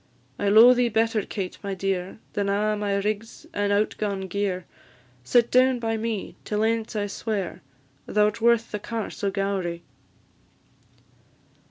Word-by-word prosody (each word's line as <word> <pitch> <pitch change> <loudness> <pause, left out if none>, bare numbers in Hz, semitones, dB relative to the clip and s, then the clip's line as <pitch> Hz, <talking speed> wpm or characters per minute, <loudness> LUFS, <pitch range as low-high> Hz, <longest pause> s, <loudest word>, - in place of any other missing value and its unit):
I 205 - +1
lo'e 225 +4 +9
thee 245 -1 +2
better, 225 0 +1
Kate, 190 -2 -5
my 200 -1 -3
dear, 190 -1 -2 0.2
Than 200 -1 -1
a' 210 +2 +1
my 205 -1 -1
rigs 210 +3 -3
and 205 0 0
out 205 +1 +2
gaun 200 -2 -1
gear; 190 -1 -2 0.6
Sit 235 - +3
down 255 0 +5
by 225 -1 -1
me 220 -2 -3
till 210 0 -1
ance 225 0 0
I 205 -1 0
swear, 205 -2 -3 0.5
Thou 210 0 +3
'rt 225 +2 -9
worth 235 0 +3
the 210 - -3
Carse 225 0 -5
o' 200 - +2
Gowrie." 195 -4 -2
210 Hz, 155 wpm, -25 LUFS, 200-225 Hz, 0.6 s, lo'e